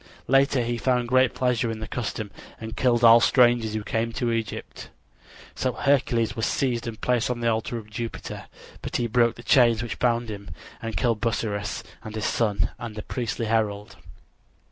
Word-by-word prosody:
Later 135 -1 +3
he 120 0 -2
found 125 -2 +1
great 130 0 +3
pleasure 125 -2 +1
in 115 - -3
the 110 - -6
custom 110 -3 -4 0.3
and 110 0 -7
killed 120 -2 +2
all 115 0 +9
strangers 120 -3 +3
who 110 - -2
came 115 +2 -1
to 120 -1 -1
Egypt. 115 -1 -4 0.6
So 130 -1 -1
Hercules 120 -5 +1
was 115 - 0
seized 120 -4 -1
and 110 -2 -6
placed 125 -2 +1
on 125 -1 -2
the 120 - 0
altar 110 +2 -2
of 110 -2 -8
Jupiter. 115 +2 -6 0.4
But - - -6
he 120 - +1
broke 120 0 +2
the 120 - -12
chains 120 -3 +4
which 120 - -5
bound 120 -1 +1
him, 100 -1 -7 0.3
and 115 -1 -4
killed 115 -4 +1
Busiris 105 -3 -2 0.2
and 110 -1 -8
his 110 - -2
son 105 -3 0
and 115 -2 -6
the 105 - -6
priestly 120 -2 -3
herald. 105 -1 -1
115 Hz, 185 wpm, -25 LUFS, 110-120 Hz, 0.6 s, all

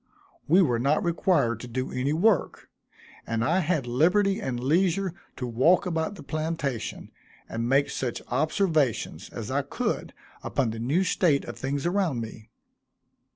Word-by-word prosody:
We 180 +5 +6
were 120 -7 +1
not 140 +5 +2
required 170 - +1
to 125 - -8
do 130 +2 -3
any 130 +3 -1
work; 180 +3 +1 0.6
and 115 0 0
I 170 +9 +2
had 160 -6 0
liberty 185 - +2
and 125 -9 -3
leisure 175 +6 +1 0.2
to 125 - -4
walk 130 - +3
about 165 +2 -1
the - - -11
plantation, 155 -6 -3 0.4
and 115 +1 -3
make 140 +2 +3
such 125 -3 -3
observations 155 - 0
as - - -6
I - - +1
could - - -3 0.3
upon 125 -5 0
the 110 - -6
new 140 +11 +1
state 165 -6 +2
of - - -7
things 140 +2 -3
around 175 -7 +1
me. 110 -1 -8
145 Hz, 155 wpm, -26 LUFS, 125-175 Hz, 0.6 s, We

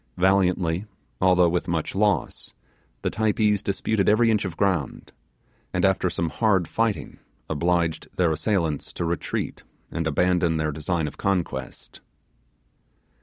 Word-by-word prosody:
Valiantly, 90 -1 +2 0.4
although 90 -1 +5
with 85 +1 -1
much 85 -2 -1
loss, 100 -4 0 0.5
the - - 0
Typees 105 -2 +1
disputed 100 0 0
every 115 +2 +4
inch 105 -2 +1
of 85 -3 -5
ground, 90 -9 -1 0.6
and - - +2
after - - +2
some 85 - -2
hard 100 -7 +2
fighting 115 +3 -2 0.3
obliged 85 +1 0
their 85 -3 +2
assailants 80 -3 -1
to 85 - -3
retreat 85 0 -3 0.3
and 80 -1 -2
abandon 85 +1 +2
their 75 0 0
design 80 +2 -1
of 70 - -9
conquest. 95 -3 -3
90 Hz, 125 wpm, -24 LUFS, 80-100 Hz, 0.6 s, although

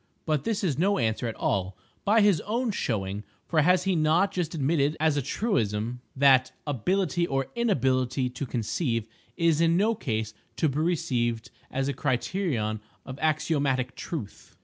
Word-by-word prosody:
But 155 -3 0
this 225 -3 -1
is 155 -7 0
no 200 +4 +3
answer 115 0 0
at 115 - -4
all, 95 -1 -1 0.3
by 215 +2 +4
his 200 -7 +4
own 230 +3 -1
showing, 105 - -2 0.2
for 160 -2 +2
has 180 +3 +4
he 190 -1 +1
not 165 +5 +3
just 175 -2 -2
admitted 150 0 +1
as 155 -1 +2
a 145 - +1
truism 120 - -1
that 135 -1 +5
"ability 170 - 0
or 135 -2 -2
inability 130 - +1
to 130 +2 -5
conceive 115 0 -1 0.3
is 165 -2 +3
in 165 0 +4
no 215 +4 +3
case 110 - -3 0.2
to 160 - +2
be 140 +1 -1
received 120 -9 0 0.2
as 135 0 -1
a 140 - 0
criterion 130 - -1 0.3
of 130 +1 -8
axiomatic 145 -5 0
truth." 135 - -7
145 Hz, 160 wpm, -27 LUFS, 120-175 Hz, 0.3 s, that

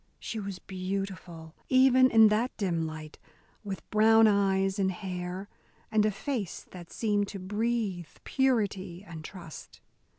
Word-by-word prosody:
She 225 - -5
was 200 -2 -5
beautiful 185 -4 -5 0.2
even 260 0 +6
in 225 -2 +7
that 225 +4 0
dim 170 -6 -1
light, 155 -1 -9 0.4
with 195 -5 -6
brown 225 +1 +6
eyes 195 -1 +2
and 190 -1 +2
hair, 180 0 -5 0.4
and 215 -1 +3
a - - +1
face 210 - -4
that 175 -2 -11
seemed 205 -2 0
to 200 - -7
breathe 205 -2 -2 0.2
purity 200 -9 0
and 160 -2 -8
trust. 170 -1 -10
195 Hz, 135 wpm, -29 LUFS, 180-220 Hz, 0.4 s, in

